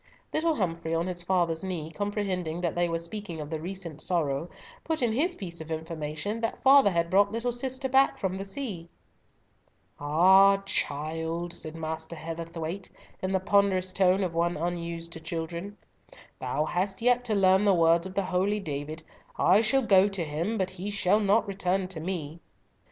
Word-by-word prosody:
Little 320 0 +2
Humfrey, 165 - -2
on 165 +1 0
his 180 -1 -4
father's 175 -2 0
knee, 170 -4 -4
comprehending 190 -5 -2
that 170 -3 0
they 175 0 +1
were 165 - 0
speaking 170 0 -6
of 150 0 -6
the 160 -1 -3
recent 170 -4 -6
sorrow, 165 -3 0 0.3
put 320 -5 -1
in 235 - +2
his 325 +10 +1
piece 170 -4 -7
of 160 - -9
information 160 +5 -4
that 225 - -3
"father 270 -4 +7
had 170 -2 0
brought 200 +1 +4
little 230 +2 -1
sister 260 +2 -2
back 265 +1 +3
from 190 -1 -2
the 195 - -4
sea." 195 -5 -5 1.1
"Ah, 190 +7 +6
child!" 165 0 -2
said 155 0 -8
Master 160 0 -5
Heatherthwayte, 165 +3 -5 0.3
in 185 - -1
the 190 - +2
ponderous 190 -1 +2
tone 190 +1 +3
of 180 -3 -2
one 170 0 0
unused 170 0 -4
to 165 - -7
children, 170 +5 -5 0.6
"thou 150 - -1
hast 190 +5 -2
yet 245 0 +4
to 220 -3 0
learn 190 0 +4
the 200 -2 +4
words 170 +1 +4
of 190 - -10
the 200 - +1
holy 190 +4 +1
David, 155 -2 -5 0.3
'I 200 +4 +5
shall 265 +4 +2
go 195 -3 +5
to 195 -4 -3
him, 165 +9 -2
but 190 -2 -1
he 190 +2 -5
shall 205 0 +2
not 210 +2 +2
return 190 -1 -1
to 180 -4 -6
me.'" 165 -2 -4
180 Hz, 180 wpm, -28 LUFS, 165-200 Hz, 1.1 s, father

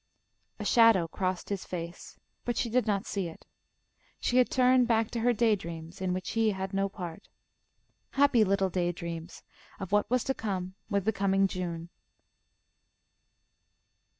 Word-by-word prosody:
A - - -5
shadow 225 -7 +5
crossed 185 +2 -3
his 200 -2 -2
face, 170 -1 -7 0.3
but 240 - -2
she 235 - -1
did 250 0 +2
not 205 0 0
see 195 -3 -2
it. 165 - -12 0.7
She 250 - +1
had 250 - +5
turned 255 -1 +4
back 225 -2 +2
to 235 - -2
her 245 +2 +3
day 225 -1 +3
dreams 165 -1 -8
in 185 -1 0
which 185 +1 -3
he 225 -1 +2
had 190 +1 -4
no 195 0 +1
part. 175 -4 -8 0.9
Happy 275 -5 +5
little 195 -1 +1
day 175 -1 0
dreams, 170 0 -7 0.4
of 190 -2 -6
what 205 0 +2
was 250 0 +2
to 270 - 0
come 190 -6 -3 0.2
with 200 -3 0
the 220 - +2
coming 195 0 +2
June. 170 -3 -5
195 Hz, 160 wpm, -29 LUFS, 180-225 Hz, 0.9 s, shadow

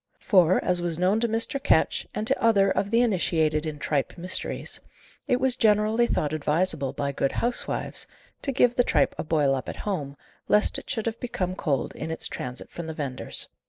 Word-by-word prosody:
For, 185 -3 +4
as 180 -1 +4
was 170 -2 -2
known 185 +5 +2
to 235 - +1
Mr. 230 +5 -1
Ketch, - - +2
and 215 - -2
to 270 - +1
other 200 -4 +4
of 200 - -1
the 230 +2 +3
initiated 160 -8 +1
in 155 -1 -5
tripe 145 +1 -2
mysteries, 180 +2 -2 0.5
it 250 - +2
was 260 -1 +2
generally 215 +2 +3
thought 150 -8 -1
advisable, 155 -2 0
by 140 +1 -3
good 135 0 -1
housewives, 245 +1 -2 0.3
to 275 - -2
give 245 -2 +3
the 245 - +3
tripe 150 -10 +2
a - - -1
boil 150 -4 +2
up 130 - -3
at - - -5
home, 145 -9 -3 0.3
lest 210 0 +4
it - - -16
should 220 - -2
have 230 0 -3
become 185 -7 -3
cold 150 -7 -2
in 155 - -6
its 160 - +2
transit 125 0 -4
from 170 -1 -7
the 160 - -6
vendor's. 135 -4 -3
180 Hz, 195 wpm, -25 LUFS, 150-225 Hz, 0.5 s, For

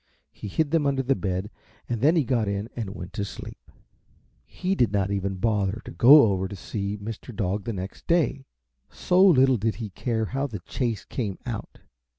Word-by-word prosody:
He - - -8
hid 150 +9 0
them 160 -4 +2
under 135 -1 +1
the 135 +2 +2
bed 95 -2 -3 0.4
and 120 -3 -3
then 155 +6 +4
he 160 - +3
got 120 -4 0
in 100 +2 -2
and 110 -4 -5
went 90 - -8
to 100 - -2
sleep. 100 - -9 0.7
He 185 +1 -3
did 120 - +2
not 100 -1 0
even 100 -1 -1
bother 105 0 0
to - - -8
go 135 - +8
over 95 -3 +1
to 100 - -8
see 100 +2 -4
Mr. 110 +3 -8
Dog 100 -1 -2
the 115 - -2
next 95 0 -7
day, 145 -5 +1 0.4
so 180 +1 +2
little 135 -9 +6
did 110 +1 -1
he 110 -4 -6
care 110 +2 -1
how 135 +6 -2
the 105 -8 -7
chase 115 +2 -3
came 105 -7 -4
out. - - -6
110 Hz, 195 wpm, -25 LUFS, 100-135 Hz, 0.7 s, go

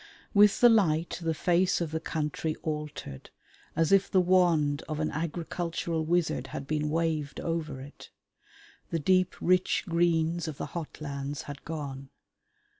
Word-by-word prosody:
With 205 -1 +5
the 245 - +9
light 175 -9 +2
the 165 -1 -1
face 180 +3 +2
of 170 -3 -2
the 160 - -1
country 155 0 -2
altered 150 - -5 0.5
as 165 +1 +2
if 195 0 +4
the 190 - +4
wand 175 -6 +3
of 155 -1 -3
an 155 - 0
agricultural 165 +1 -2
wizard 170 +1 0
had 140 - -6
been 150 +1 -1
waved 155 -2 -1
over 165 -5 -3
it. 140 +2 -11 0.8
The 165 - 0
deep 185 +3 +2
rich 185 +1 +2
greens 170 -1 +1
of 155 -3 -5
the - - -3
hot 165 -3 -6
lands 140 -1 -4
had 145 0 -9
gone. 140 -4 -6
160 Hz, 150 wpm, -29 LUFS, 150-175 Hz, 0.8 s, the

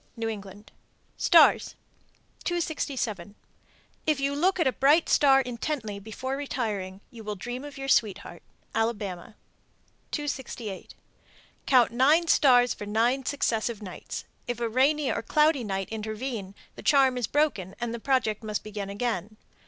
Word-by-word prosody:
New 225 0 -2
England. 205 -1 -9 0.4
STARS. - - +5 0.7
267. 270 - -2 0.7
If 305 -3 +2
you 275 +1 0
look 365 +6 +1
at 335 - +3
a 260 - +3
bright 285 +8 +4
star 270 -2 +5
intently 240 -3 -4
before 225 +6 -5
retiring, 210 -9 -3
you 230 -2 -11
will 210 0 -4
dream 245 +6 -6
of 290 -1 -9
your 270 0 -5
sweetheart. 215 -7 0 0.3
Alabama. 210 -4 -2 0.7
268. 255 -9 -5 0.7
Count 250 -4 +5
nine 285 +8 +4
stars 250 -6 +5
for 205 - -8
nine 240 +5 +1
successive 230 -5 -1
nights. 185 - -7 0.2
(If 245 -1 -3
a 235 - 0
rainy 270 +5 +2
or - - -2
cloudy 300 -3 +2
night 195 -3 -3
intervene, 215 -2 -5 0.2
the - - -9
charm 270 -3 +4
is 245 -4 -1
broken, 285 - 0
and 240 -1 -3
the 235 - -4
project 225 -4 0
must 215 -2 -3
be 215 - -9
begun 200 -1 -5
again.) 210 -1 -3
240 Hz, 145 wpm, -27 LUFS, 210-275 Hz, 0.7 s, STARS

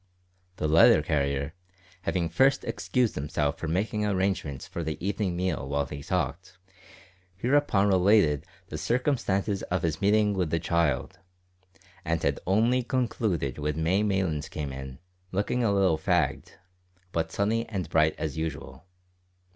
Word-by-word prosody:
The 75 - -1
letter 75 -1 +6
carrier, 70 -1 -1 0.5
having 90 -3 -1
first 135 +12 +3
excused 105 +5 0
himself 75 +1 -2
for 85 - -4
making 105 +6 -1
arrangements 95 -8 -1
for 85 - -5
the 80 -1 -3
evening 100 -1 -1
meal 85 -7 -2
while 70 0 0
he 70 0 -7
talked, 90 +6 -3 0.8
hereupon 120 -2 +2
related 95 -6 +3 0.2
the - - -5
circumstances 115 -6 0
of 90 0 -2
his 80 +1 -1
meeting 105 +1 +3
with 90 -4 -1
the 85 - +1
child, 80 -5 0 0.8
and 80 -1 -1
had - - +1
only 115 +6 +3
concluded 110 - -1
when 75 +2 -2
May 95 +5 +2
Maylands 95 -7 0
came 75 -3 -5
in, 65 -1 -7 0.3
looking 105 +6 0
a 110 - +2
little 95 -5 +2
fagged, 80 -5 0 0.6
but 80 -1 -1
sunny 110 +5 0
and 95 -6 -3
bright 80 -1 +2
as 80 0 -3
usual. 80 +3 -6
90 Hz, 140 wpm, -27 LUFS, 75-105 Hz, 0.8 s, letter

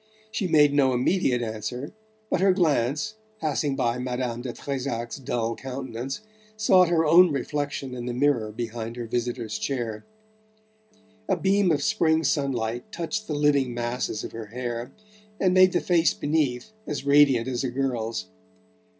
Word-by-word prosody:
She 200 - -1
made 150 -3 +5
no 135 -3 +3
immediate 125 -2 +1
answer, 115 - -5 0.4
but 180 - +1
her 190 -1 +5
glance, 150 - +1 0.3
passing 150 -2 0
by 120 -1 0
Madame 125 -1 -3
de 125 -1 -4
Trezac's 125 -3 -4
dull 120 -3 -2
countenance, 130 - -5 0.4
sought 185 -5 +5
her 165 -2 +3
own 175 +3 +7
reflection 145 -2 -3
in 120 -1 -5
the - - -1
mirror 125 -4 +1
behind 115 0 -5
her 120 -1 -5
visitor's 120 -1 -3
chair. 120 -6 -3 1.3
A 190 - +2
beam 195 +1 +3
of 145 -2 +1
spring 160 -5 +2
sunlight 125 -5 -1
touched 215 +6 -3
the 150 - -2
living 140 -4 +2
masses 120 -2 -2
of - - -6
her 115 -1 -7
hair 120 +2 -5 0.5
and 185 -2 +3
made 185 0 +6
the 180 - +2
face 170 -2 +3
beneath 145 +2 -1 0.2
as 145 -2 -4
radiant 140 -4 +5
as 130 0 -2
a 130 - -1
girl's. 120 -3 -2
135 Hz, 150 wpm, -25 LUFS, 120-155 Hz, 1.3 s, own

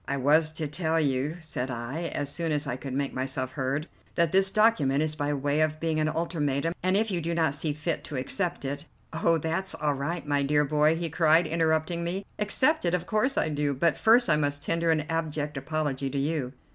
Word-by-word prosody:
"I 140 - -1
was 155 +4 +3
to 160 -1 -3
tell 160 +2 0
you," 145 +2 0
said 140 -5 -4
I, 130 +7 -4
as 145 - -1
soon 165 +3 -2
as 150 0 0
I 135 - -2
could 130 0 -6
make 140 0 -1
myself 130 0 -3
heard, 140 +3 -2 0.3
"that 170 -2 +2
this 195 0 +4
document 160 -11 +3
is 155 -1 -2
by 145 -1 -2
way 145 +1 0
of 155 0 0
being 160 -1 0
an 155 0 +1
ultimatum, 160 -2 -1
and 185 +2 +2
if 220 0 +1
you 175 -2 -1
do 170 +1 -2
not 160 -4 +2
see 150 +2 -1
fit 155 +3 -3
to 150 - -6
accept 175 +5 -2
it 145 +3 -4 0.2
" - - -27
"Oh, 165 0 +4
that's 165 +5 -2
all 150 -1 0
right, 150 +5 -3
my 145 -1 +1
dear 150 +1 +2
boy," 150 +2 +3
he 165 -1 -3
cried, 160 +1 +4
interrupting 160 +1 0
me. 185 +4 -3
"Accept 260 +9 +3
it? 170 +1 +2
Of 175 -1 -3
course 220 +7 +1
I - - +2
do, 145 -1 -1
but 165 +5 +2
first 235 +2 +4
I 150 - +3
must 145 -1 -1
tender 165 +1 0
an 160 -1 +3
abject 155 -1 -3
apology 140 -2 -2
to 140 - -4
you." 140 -2 -1
155 Hz, 225 wpm, -27 LUFS, 145-170 Hz, 0.3 s, this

